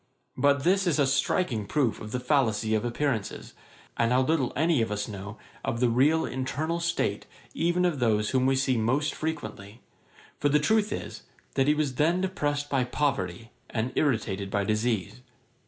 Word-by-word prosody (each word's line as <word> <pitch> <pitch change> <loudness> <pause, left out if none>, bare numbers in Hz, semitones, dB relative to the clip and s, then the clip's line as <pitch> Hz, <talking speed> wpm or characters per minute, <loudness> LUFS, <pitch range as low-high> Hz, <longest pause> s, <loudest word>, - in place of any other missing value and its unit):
But 140 +1 +2
this 190 +3 +3
is 165 - +2
a 145 - +4
striking 130 - 0
proof 135 -7 0
of 105 - -7
the 125 - -1
fallacy 115 -5 +1
of 110 0 +1
appearances, 120 -2 -2 0.4
and 115 0 +1
how 130 +1 +4
little 145 -3 +1
any 160 -2 +2
of 110 - -1
us 105 0 -2
know 100 +1 -7 0.3
of 115 - -2
the 125 -1 +3
real 150 +7 +3
internal 145 +6 -2
state 170 0 -1 0.3
even 175 +2 +1
of 165 -6 0
those 105 -3 +1
whom 130 -1 +2
we 135 - +3
see 130 -1 +1
most 130 +7 +1
frequently; 110 -9 -5 0.6
for 145 - +2
the 145 - +4
truth 210 +6 +2
is, - - -5 0.3
that 135 - +2
he 150 - +4
was 150 -3 0
then 165 +4 +3
depressed 145 -6 -1
by 135 -3 +1
poverty, 115 -6 -2 0.2
and 120 +2 -2
irritated 105 -8 0
by 100 0 0
disease. 110 +1 -1
130 Hz, 175 wpm, -27 LUFS, 110-150 Hz, 0.6 s, a